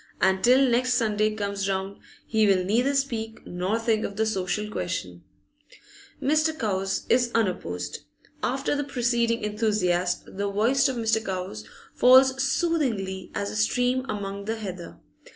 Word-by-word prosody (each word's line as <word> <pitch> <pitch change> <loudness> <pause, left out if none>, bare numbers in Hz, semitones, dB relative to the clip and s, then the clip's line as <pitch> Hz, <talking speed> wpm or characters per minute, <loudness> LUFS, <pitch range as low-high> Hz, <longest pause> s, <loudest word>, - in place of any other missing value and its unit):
And 190 0 +2
till 260 +2 +5
next 250 +1 +2
Sunday 215 -2 +1
comes 200 -1 -2
round 195 +1 -3 0.3
he 220 -2 +2
will 190 -2 +3
neither 245 +8 +1
speak 230 -5 -2
nor 180 +5 -2
think 225 -1 0
of 200 - -4
the 220 +2 +1
social 205 0 -2
question. 90 - -4 1.0
Mr. 310 +3 +1
Cowes 195 -6 -1
is 245 0 +3
unopposed. 90 - -2 0.4
After 270 +3 -1
the 290 - -1
preceding 235 -3 0
enthusiast, 205 -5 0
the 200 0 -1
voice 235 +8 +2
of 260 - -3
Mr. 225 -1 +1
Cowes 185 - -5 0.3
falls 260 +1 +6
soothingly 255 - -1
as 100 - -2
a - - -7
stream 245 - +1
among 200 -1 -4
the 220 +2 -2
heather. 185 - -7
215 Hz, 145 wpm, -25 LUFS, 190-245 Hz, 1.0 s, falls